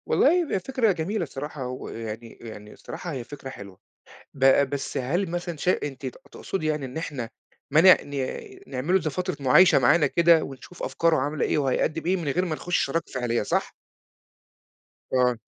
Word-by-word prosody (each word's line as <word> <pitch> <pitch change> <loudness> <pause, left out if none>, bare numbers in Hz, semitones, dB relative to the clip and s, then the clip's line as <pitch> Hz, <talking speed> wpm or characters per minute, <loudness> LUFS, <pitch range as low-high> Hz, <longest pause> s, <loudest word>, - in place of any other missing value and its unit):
والله - - +4
هي 350 0 +2
ب 285 - -1
فكرة 230 +2 +1
جميلة 180 +3 -2
الصراحة، 140 -2 -6
و 130 0 -6
يعني 115 0 -7
يعني 105 -2 -10
الصراحة 175 - -7
هي 130 -5 -4
فكرة 135 +1 -9
حلوة، 100 -6 -10 0.6
ب 135 0 +4
بس 140 -1 -4
هل 165 +8 -1
مثلًا 175 -1 -4
شا 180 +5 0
أنتِ 135 -2 -5
ت 130 - -6 0.2
تُقصدي 175 -5 -4
يعني 150 -3 -1
إن 130 - -10
إحنا 140 -7 -4 0.4
ما 155 - +6
نع 185 +2 +9
ن 145 - -10 0.5
نعمِل 135 +7 -2
له، 190 - +5
زي 155 - -2
فترة 180 +5 -3
مُعايشة 140 +7 +6
معانا 145 +5 +4
كده 170 -2 +4
ونشوف 140 +6 -10
أفكاره 165 -1 +1
عاملة 145 +2 -1
إيه، - - +1
وهيقدّم 150 +4 0
إيه 185 +2 +2
من 165 -5 -4
غير 180 +7 +1
ما 170 -4 -2
نخُش 180 +3 -2
شراكة 165 +4 -3
فعلية، 120 -2 0
صح؟ - - -1 1.4
آه. 125 -2 +3
150 Hz, 185 wpm, -25 LUFS, 130-175 Hz, 1.4 s, نع